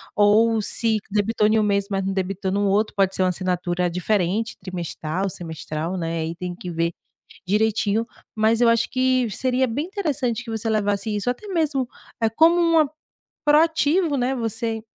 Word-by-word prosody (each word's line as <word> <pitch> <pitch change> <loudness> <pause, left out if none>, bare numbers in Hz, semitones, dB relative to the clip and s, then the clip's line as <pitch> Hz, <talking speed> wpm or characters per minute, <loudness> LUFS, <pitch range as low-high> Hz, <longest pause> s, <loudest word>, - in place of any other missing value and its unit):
ou 220 +2 +4
se 220 +1 0
debitou 210 +1 +2
em 220 +1 +3
um - - +2
mês, 200 -1 +1
mas 195 -1 -1
não 195 - 0
debitou 190 0 -2
no 200 +1 +1
outro. 210 +2 +1
Pode 195 -1 +2
ser 185 - +1
uma 185 - +3
assinatura 180 -1 -1
diferente, 195 +4 -1
trimestral, 180 0 -4
semestral, 160 0 -5
né. 165 -1 -2
Aí 160 +1 -3
tem 180 +1 -5
que 180 - -7
ver 165 0 0 0.6
direitinho, 215 +1 +1 0.3
mas 220 +1 +2
eu 240 - +5
acho 230 0 +2
que 255 -2 +1
seria 255 +4 +1
bem 265 +7 -2
interessante 290 - -2
que 230 - -7
você 225 0 -2
levasse 205 0 0
isso 205 +4 -1
até 250 +12 -4
mesmo 305 -9 0 0.3
é 225 - +3
como 320 +10 +5
uma 330 -4 +4 0.6
proativo, 315 +1 +3
né. 255 +1 0
Você 225 -1 -3
215 Hz, 170 wpm, -23 LUFS, 190-245 Hz, 0.6 s, eu